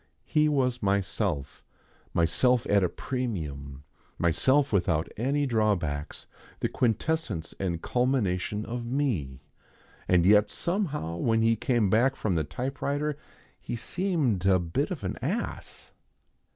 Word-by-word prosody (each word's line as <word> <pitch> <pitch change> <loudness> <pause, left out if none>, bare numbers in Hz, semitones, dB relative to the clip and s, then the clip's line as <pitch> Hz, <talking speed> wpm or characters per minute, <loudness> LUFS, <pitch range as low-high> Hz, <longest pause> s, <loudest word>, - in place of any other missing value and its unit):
He 155 -1 +3
was 125 -4 +1
myself 95 -8 -1 0.5
myself 120 +9 +2
at 100 -1 +4
a 90 - +2
premium, 75 - -4 0.3
myself 130 - +2
without 85 -4 +2
any 140 +6 0
drawbacks, 100 - -1 0.3
the - - 0
quintessence 115 - -1
and 85 -4 -2
culmination 105 -5 0
of 120 +1 -4
me. 105 - -1 0.7
And 90 -2 +4
yet 105 +2 +6
somehow 150 - -2
when 115 +5 +2
he 115 0 +4
came 115 -3 +1
back 130 +5 +3
from 110 -7 -1
the 80 -2 +1
typewriter 140 - -2 0.4
he - - -5
seemed 145 - 0
a 95 -1 +6
bit 85 -2 -1
of - - -5
an - - -3
ass. - - -4
110 Hz, 125 wpm, -28 LUFS, 85-130 Hz, 0.7 s, yet